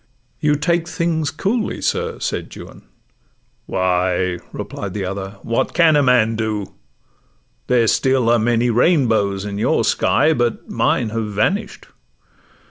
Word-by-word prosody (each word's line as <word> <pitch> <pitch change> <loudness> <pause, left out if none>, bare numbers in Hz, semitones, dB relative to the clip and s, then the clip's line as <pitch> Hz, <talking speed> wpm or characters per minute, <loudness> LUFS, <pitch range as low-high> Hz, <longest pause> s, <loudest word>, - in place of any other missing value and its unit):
'You 150 -1 +2
take 170 +3 0
things 165 -4 -1
coolly, 205 +9 -2
sir,' - - -2
said - - -4
Juan. - - -11 0.9
'Why,' 90 -1 0
Replied 100 -1 -6
the 100 -2 -2
other, 95 +1 -5
'what 115 - -1
can 165 -3 +5
a 145 - +4
man 125 -4 +3
do? 110 -3 -3 0.9
There 120 -2 +3
still 130 +1 +2
are 120 - +4
many 120 +2 +1
rainbows 110 - +2
in 100 0 -5
your - - +1
sky, 155 +2 +2
But 120 -5 -1
mine 115 - 0
have 110 0 -3
vanish'd. 190 - -1
115 Hz, 130 wpm, -19 LUFS, 100-150 Hz, 0.9 s, can